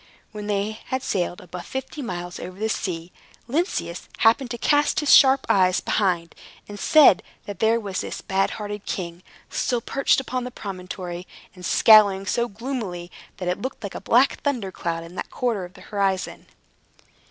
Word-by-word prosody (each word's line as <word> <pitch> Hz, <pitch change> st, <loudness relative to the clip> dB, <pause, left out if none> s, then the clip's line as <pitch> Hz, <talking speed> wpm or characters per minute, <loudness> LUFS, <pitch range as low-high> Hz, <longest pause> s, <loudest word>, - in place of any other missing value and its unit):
When 210 Hz, -1 st, -7 dB
they 205 Hz, +1 st, 0 dB
had 260 Hz, 0 st, -3 dB
sailed 175 Hz, -2 st, -2 dB
above 180 Hz, 0 st, -9 dB
fifty 265 Hz, +3 st, -5 dB
miles 175 Hz, -7 st, -5 dB
over 185 Hz, 0 st, -8 dB
the 220 Hz, +2 st, -1 dB
sea, 175 Hz, -5 st, -3 dB, 0.4 s
Lynceus 330 Hz, -, -2 dB
happened 240 Hz, +3 st, +3 dB
to 240 Hz, -, -4 dB
cast 290 Hz, +5 st, +2 dB
his 295 Hz, -2 st, +4 dB
sharp 265 Hz, 0 st, +6 dB
eyes 185 Hz, -2 st, +4 dB
behind, 175 Hz, -5 st, 0 dB, 0.3 s
and 205 Hz, 0 st, -8 dB
said 305 Hz, +5 st, +6 dB, 0.2 s
that 205 Hz, -3 st, -7 dB
there 225 Hz, +1 st, +3 dB
was 200 Hz, -4 st, -3 dB
this -, -, -5 dB
bad 195 Hz, 0 st, 0 dB
hearted 205 Hz, -1 st, -6 dB
king, 175 Hz, -2 st, -4 dB, 0.3 s
still 245 Hz, -2 st, 0 dB
perched 275 Hz, +4 st, +1 dB
upon 255 Hz, -1 st, -3 dB
the 250 Hz, -, -4 dB
promontory, 185 Hz, -4 st, -7 dB, 0.3 s
and 180 Hz, -, -13 dB
scowling 200 Hz, 0 st, +6 dB
so 235 Hz, +4 st, 0 dB
gloomily 205 Hz, -7 st, -5 dB, 0.3 s
that 180 Hz, -, -5 dB
it 180 Hz, -, -1 dB
looked 260 Hz, -3 st, -5 dB
like 200 Hz, -, -5 dB
a -, -, -6 dB
black 250 Hz, +4 st, +3 dB
thunder 245 Hz, -10 st, -1 dB
cloud 165 Hz, -2 st, -3 dB
in 165 Hz, +1 st, -11 dB
that -, -, -5 dB
quarter 225 Hz, -7 st, -1 dB
of 180 Hz, +2 st, -14 dB
the 185 Hz, -, -14 dB
horizon. 195 Hz, -2 st, -2 dB
205 Hz, 175 wpm, -24 LUFS, 180-245 Hz, 0.4 s, sharp